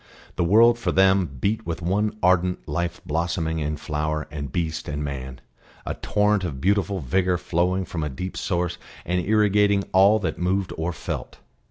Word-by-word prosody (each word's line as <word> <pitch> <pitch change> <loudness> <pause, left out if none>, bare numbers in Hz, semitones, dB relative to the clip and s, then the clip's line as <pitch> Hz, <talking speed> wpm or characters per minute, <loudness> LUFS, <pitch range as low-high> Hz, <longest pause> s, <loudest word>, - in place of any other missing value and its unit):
The - - +1
world, 115 +6 +5
for - - 0
them, 95 -1 +4
beat 110 - 0
with 85 0 -4
one 105 +5 0
ardent 90 -2 +2
life 85 +3 -2
blossoming 80 +1 -1
in 75 0 -2
flower 75 0 -2
and 70 -3 -5
beast 80 0 -2
and 75 0 -3
man, 65 -2 -6 0.4
a - - -2
torrent 105 -1 +1
of 75 -7 -4
beautiful 100 +2 +1
vigour 90 +6 +1
flowing 90 +2 0
from 85 - -5
a 75 - -1
deep 90 +8 -6
source 90 -1 -2 0.3
and 90 0 0
irrigating 105 -1 +3
all 100 +3 +6
that - - -3
moved 95 +1 0
or 80 +2 -2
felt. - - -6
90 Hz, 170 wpm, -24 LUFS, 80-100 Hz, 0.4 s, all